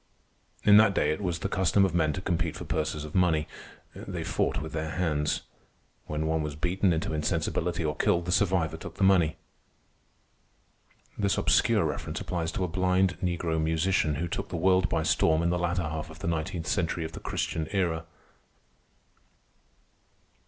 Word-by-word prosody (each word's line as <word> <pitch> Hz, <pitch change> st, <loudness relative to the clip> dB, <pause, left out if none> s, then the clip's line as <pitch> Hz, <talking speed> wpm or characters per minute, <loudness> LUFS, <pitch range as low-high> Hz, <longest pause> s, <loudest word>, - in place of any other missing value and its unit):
In 105 Hz, 0 st, +7 dB
that 105 Hz, -2 st, +5 dB
day 75 Hz, -, +2 dB
it 75 Hz, -, -3 dB
was 90 Hz, -4 st, -1 dB
the -, -, -3 dB
custom 95 Hz, +2 st, +3 dB
of 95 Hz, -, -2 dB
men 80 Hz, -3 st, +2 dB
to 95 Hz, -, -4 dB
compete 85 Hz, -3 st, -1 dB
for -, -, -6 dB
purses 75 Hz, 0 st, -2 dB
of 75 Hz, -, -9 dB
money. 85 Hz, -4 st, +2 dB, 0.5 s
They -, -, -5 dB
fought -, -, 0 dB
with 80 Hz, +2 st, -7 dB
their 80 Hz, 0 st, -2 dB
hands. 75 Hz, -4 st, -1 dB, 0.6 s
When 75 Hz, +1 st, -2 dB
one 80 Hz, 0 st, 0 dB
was 75 Hz, -1 st, -4 dB
beaten 90 Hz, +4 st, +1 dB
into 80 Hz, -1 st, -1 dB
insensibility 80 Hz, +2 st, -1 dB
or 75 Hz, 0 st, -1 dB
killed, 85 Hz, +2 st, +1 dB
the 90 Hz, -, -2 dB
survivor 90 Hz, -5 st, +1 dB
took -, -, -9 dB
the -, -, -2 dB
money. 90 Hz, -4 st, +4 dB, 1.8 s
This 100 Hz, -2 st, +1 dB
obscure -, -, +3 dB
reference -, -, -3 dB
applies 85 Hz, -2 st, -3 dB
to 95 Hz, -, -1 dB
a -, -, 0 dB
blind 90 Hz, +1 st, +1 dB
negro 85 Hz, -3 st, -1 dB
musician 80 Hz, 0 st, +1 dB
who 85 Hz, +5 st, -2 dB
took 100 Hz, +4 st, -4 dB
the 85 Hz, -, -3 dB
world 90 Hz, +1 st, +3 dB
by 80 Hz, -1 st, 0 dB
storm 80 Hz, 0 st, +2 dB
in 85 Hz, -, +1 dB
the 90 Hz, -, 0 dB
latter 85 Hz, +1 st, 0 dB
half 75 Hz, 0 st, -4 dB
of -, -, -11 dB
the -, -, -5 dB
nineteenth 80 Hz, 0 st, -2 dB
century 85 Hz, -2 st, -1 dB
of 80 Hz, -, -6 dB
the -, -, -8 dB
Christian 80 Hz, -1 st, -2 dB
Era. 85 Hz, -5 st, -1 dB
85 Hz, 175 wpm, -28 LUFS, 80-90 Hz, 1.8 s, In